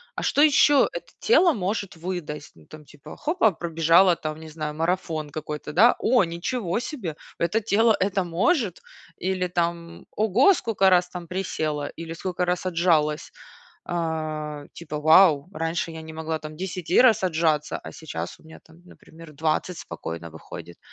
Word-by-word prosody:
"А -, -, -4 dB
что 285 Hz, -, +2 dB
еще 290 Hz, -1 st, +5 dB
это -, -, -8 dB
тело 375 Hz, -8 st, +4 dB
может 200 Hz, -2 st, -3 dB
выдать?" 165 Hz, -4 st, -6 dB
Ну 80 Hz, -, -19 dB
там 155 Hz, -, -13 dB
типа 145 Hz, -1 st, -13 dB
хопа- 300 Hz, -, +2 dB
пробежала 170 Hz, +2 st, +3 dB
там, 155 Hz, -1 st, -5 dB
не 160 Hz, 0 st, -10 dB
знаю, 155 Hz, -1 st, -5 dB
марафон 165 Hz, -2 st, -2 dB
какой-то, 150 Hz, 0 st, -6 dB
да. 215 Hz, +10 st, +5 dB
"О, 240 Hz, -5 st, +3 dB
ничего 175 Hz, +4 st, -2 dB
себе! 225 Hz, -, -5 dB, 0.2 s
Это 170 Hz, +7 st, 0 dB
тело 225 Hz, +1 st, +3 dB
это 190 Hz, 0 st, +1 dB
может?" 195 Hz, -, 0 dB, 0.4 s
Или 185 Hz, 0 st, -1 dB
там: 170 Hz, -1 st, -3 dB
"Ого, 220 Hz, -, +4 dB
сколько 210 Hz, -, +2 dB
раз 180 Hz, -1 st, +3 dB
там 175 Hz, -1 st, -8 dB
присела, 155 Hz, -6 st, -2 dB
или 165 Hz, 0 st, -7 dB
сколько 180 Hz, +1 st, -2 dB
раз 180 Hz, +1 st, -1 dB
отжалась!" 165 Hz, -4 st, +1 dB, 0.6 s
А, 155 Hz, -3 st, -3 dB
типа: 155 Hz, -3 st, -6 dB
"Вау! 155 Hz, -1 st, +5 dB
Раньше 165 Hz, +1 st, -2 dB
я 160 Hz, 0 st, -8 dB
не 160 Hz, 0 st, -9 dB
могла 160 Hz, 0 st, -3 dB
там 155 Hz, 0 st, -9 dB
10 180 Hz, -1 st, -5 dB
раз 235 Hz, -6 st, +5 dB
отжаться, 160 Hz, -4 st, +1 dB
а -, -, -10 dB
сейчас 160 Hz, -2 st, -7 dB
у -, -, -22 dB
меня 160 Hz, 0 st, -13 dB
там, 160 Hz, 0 st, -19 dB
например, 165 Hz, -2 st, -15 dB
20 160 Hz, +4 st, -1 dB
спокойно 85 Hz, 0 st, -7 dB
выходит". 85 Hz, +1 st, -10 dB
170 Hz, 160 wpm, -24 LUFS, 155-190 Hz, 0.6 s, еще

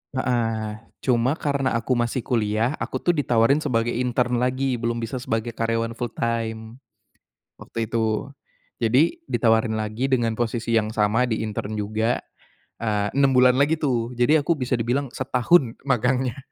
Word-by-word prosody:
Heeh, 115 Hz, -4 st, -1 dB, 0.2 s
cuma 125 Hz, +2 st, +2 dB
karena 140 Hz, -5 st, -1 dB
aku 115 Hz, +3 st, -2 dB
masih 120 Hz, 0 st, 0 dB
kuliah, 110 Hz, 0 st, 0 dB
aku -, -, -4 dB
tuh 175 Hz, -, +4 dB
ditawarin 135 Hz, -3 st, +2 dB
sebagai 120 Hz, -6 st, 0 dB
intern 125 Hz, 0 st, 0 dB
lagi, 130 Hz, 0 st, 0 dB
bisa 115 Hz, +1 st, -2 dB
sebagai 115 Hz, -1 st, -2 dB
karyawan 115 Hz, 0 st, -1 dB
fulltime, 115 Hz, -1 st, -3 dB, 0.8 s
waktu 115 Hz, -, -4 dB
itu. 110 Hz, +4 st, -1 dB, 0.5 s
Jadi 130 Hz, -, +2 dB
ditawarin 110 Hz, -2 st, +2 dB
lagi 110 Hz, +4 st, -2 dB
dengan 120 Hz, -4 st, +1 dB
posisi 115 Hz, 0 st, -2 dB
yang 110 Hz, -2 st, +2 dB
sama 110 Hz, +3 st, +2 dB
di 110 Hz, -1 st, -1 dB
intern 110 Hz, 0 st, -4 dB
juga, 110 Hz, +3 st, 0 dB, 0.6 s
eee, 105 Hz, -2 st, 0 dB
6 140 Hz, -1 st, +4 dB
bulan 125 Hz, 0 st, +6 dB
lagi 150 Hz, +3 st, +3 dB
tuh, 125 Hz, -4 st, -1 dB
jadi 145 Hz, +6 st, +4 dB
aku 170 Hz, -, +2 dB
bisa 125 Hz, 0 st, -3 dB
dibilang 125 Hz, +4 st, -1 dB
setahun 130 Hz, 0 st, +2 dB
magangnya. 125 Hz, -1 st, 0 dB
120 Hz, 140 wpm, -23 LUFS, 115-130 Hz, 0.8 s, bulan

